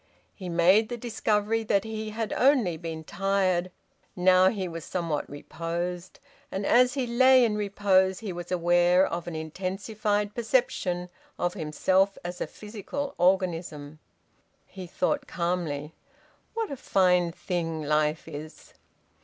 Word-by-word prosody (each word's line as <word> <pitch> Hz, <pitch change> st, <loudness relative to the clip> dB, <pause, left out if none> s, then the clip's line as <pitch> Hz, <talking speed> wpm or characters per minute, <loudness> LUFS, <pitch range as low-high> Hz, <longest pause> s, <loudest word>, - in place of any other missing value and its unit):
He 185 Hz, -3 st, -8 dB
made 185 Hz, +6 st, +4 dB
the 240 Hz, -, -4 dB
discovery 220 Hz, -1 st, 0 dB
that 200 Hz, -2 st, +2 dB
he 220 Hz, -1 st, -5 dB
had 220 Hz, 0 st, -3 dB
only 250 Hz, -, +3 dB
been 160 Hz, -1 st, -6 dB
tired. 185 Hz, 0 st, 0 dB, 0.5 s
Now 185 Hz, +1 st, +5 dB
he 190 Hz, -4 st, -3 dB
was 165 Hz, -1 st, -7 dB
somewhat 170 Hz, -4 st, -3 dB
reposed. 170 Hz, +4 st, -5 dB, 0.3 s
And 195 Hz, +1 st, -3 dB
as 250 Hz, +3 st, +4 dB
he 265 Hz, -2 st, 0 dB
lay 255 Hz, +1 st, +5 dB
in 215 Hz, -2 st, 0 dB
repose 195 Hz, -2 st, +2 dB
he 210 Hz, -5 st, -5 dB
was 175 Hz, 0 st, -7 dB
aware 175 Hz, +1 st, +4 dB
of 170 Hz, 0 st, -4 dB
an 170 Hz, -, -5 dB
intensified 200 Hz, +5 st, -2 dB
perception 200 Hz, -7 st, 0 dB, 0.3 s
of 175 Hz, 0 st, -1 dB
himself 190 Hz, +3 st, +1 dB
as 175 Hz, 0 st, -6 dB
a -, -, -1 dB
physical 225 Hz, +7 st, -6 dB
organism. 170 Hz, -5 st, 0 dB, 0.7 s
He 185 Hz, -2 st, -9 dB
thought 275 Hz, -, -1 dB
calmly, 165 Hz, -4 st, -2 dB, 0.6 s
"_What 450 Hz, -6 st, -2 dB
a 280 Hz, -, -4 dB
fine 180 Hz, -5 st, +2 dB
thing 165 Hz, -3 st, -3 dB
life 150 Hz, +1 st, 0 dB
is! 155 Hz, +2 st, -10 dB
185 Hz, 135 wpm, -27 LUFS, 170-210 Hz, 0.7 s, Now